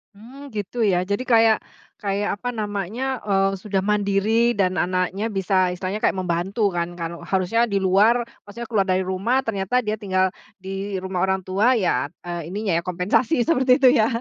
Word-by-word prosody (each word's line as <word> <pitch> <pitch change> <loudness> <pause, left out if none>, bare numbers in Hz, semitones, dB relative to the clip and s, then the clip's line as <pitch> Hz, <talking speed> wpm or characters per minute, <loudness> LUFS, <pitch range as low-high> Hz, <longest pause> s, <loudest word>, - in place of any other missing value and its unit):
Mmm. 260 +7 -12
Gitu 210 +4 -4
ya? 180 -2 +2
Jadi 200 +7 -3
kayak 225 -2 +5 0.4
kayak 205 0 -2
apa 245 - -3
namanya. 215 +5 -3
Eee, 195 -1 +1
sudah 195 -1 -2
mandiri, 210 +3 +2
dan 185 -2 +1
anaknya 185 +4 -1
bisa 190 -3 +1
istilahnya, 190 +3 -4
kayak - - +1
membantu 185 +4 -1
kan. 175 0 -3
Kalo 170 0 -5
harusnya 195 +5 +1
di 200 -2 0
luar, 215 +6 +4 0.2
maksudnya 235 +3 -7
keluar 200 -3 +2
dari 185 0 +1
rumah, 200 +8 0
ternyata 225 +3 -1
dia 215 0 -1
tinggal 185 -2 +1 0.2
di 195 +1 -5
rumah 185 -1 -3
orang 190 -1 0
tua, 210 +8 +2
ya 145 - +1 0.2
eee, 175 -2 -5
ininya 200 +1 -3
ya. - - -5
Kompensasi 195 - +1
seperti 260 -6 +3
itu, 260 -2 +7
ya? 215 - +4
200 Hz, 175 wpm, -22 LUFS, 185-225 Hz, 0.4 s, itu